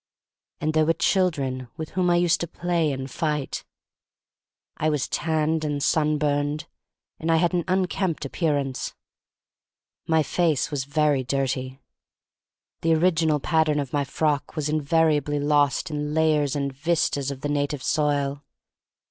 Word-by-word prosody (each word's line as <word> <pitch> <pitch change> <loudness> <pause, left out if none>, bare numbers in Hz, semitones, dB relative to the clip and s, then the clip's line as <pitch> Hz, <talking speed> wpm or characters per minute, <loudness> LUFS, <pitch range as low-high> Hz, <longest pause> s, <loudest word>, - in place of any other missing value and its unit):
And 155 +1 -1
there 155 0 +3
were 165 - +4
children 155 -8 0
with 160 -2 -5
whom 180 -1 +1
I 175 - +4
used 175 -1 +2
to 170 - -2
play 170 -2 0
and 135 -1 -4
fight. 150 +1 -2 1.1
I 155 - +1
was 150 -3 0
tanned 160 0 0
and 145 -2 -2
sunburned, 150 -1 +1 0.5
and 165 +1 0
I - - +5
had 170 +2 +2
an 175 -1 +1
unkempt 185 -3 0
appearance. 140 -3 -1 1.1
My 160 -1 +3
face 160 -1 +1
was 140 -3 -2
very 145 -2 +1
dirty. 130 0 -2 1.0
The 165 0 +3
original 160 -2 +2
pattern 155 0 +2
of 140 -3 -4
my 145 -1 +1
frock 145 +1 -1
was 150 -2 -1
invariably 150 -1 +2
lost 145 +1 +2
in 150 0 -3
lay 160 -1 +4
ers 145 -1 -1
and 140 -1 -2
vistas 145 -2 0
of 135 -1 -6
the 145 - -2
native 145 -1 -1
soil. 145 -1 0
150 Hz, 145 wpm, -24 LUFS, 140-160 Hz, 1.1 s, I